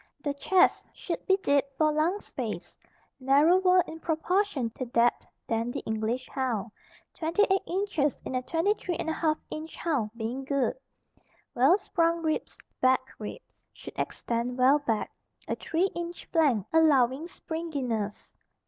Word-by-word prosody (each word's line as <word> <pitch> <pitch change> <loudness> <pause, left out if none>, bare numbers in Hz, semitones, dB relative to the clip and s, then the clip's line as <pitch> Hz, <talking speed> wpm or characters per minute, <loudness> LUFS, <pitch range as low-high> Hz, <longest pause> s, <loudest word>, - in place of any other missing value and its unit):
The 285 - -1
chest 360 +6 +3
should 335 - -4
be 385 - +5
deep 280 -1 +3
for 310 -1 +3
lung 320 +6 +1
space, - - -6 0.4
narrower 350 +7 +5
in 320 - -8
proportion 320 - 0
to 255 - -5
depth 235 0 +2 0.2
than 230 +1 -1
the - - -4
English 220 +3 -2
hound, 235 -5 -2 0.4
28 385 +4 +2
inches 350 -7 0
in - - -4
a 255 - 0
23 350 +4 0
1/2 315 -1 0
inch 310 +1 -6
hound 280 -11 -1
being 240 +4 -3
good. 275 -1 0 0.8
Well 270 +10 +5
sprung 335 -4 0
ribs, 315 -1 -2 0.2
back 260 0 +3
ribs 215 - -9
should - - -10
extend 240 +1 -2
well 265 +3 +5
back, 230 -7 -1 0.4
a - - -1
three 355 +4 0
inch 345 0 -6
flank 280 - +3
allowing 290 -2 +4
springiness. 275 - -4
295 Hz, 135 wpm, -28 LUFS, 250-335 Hz, 0.8 s, be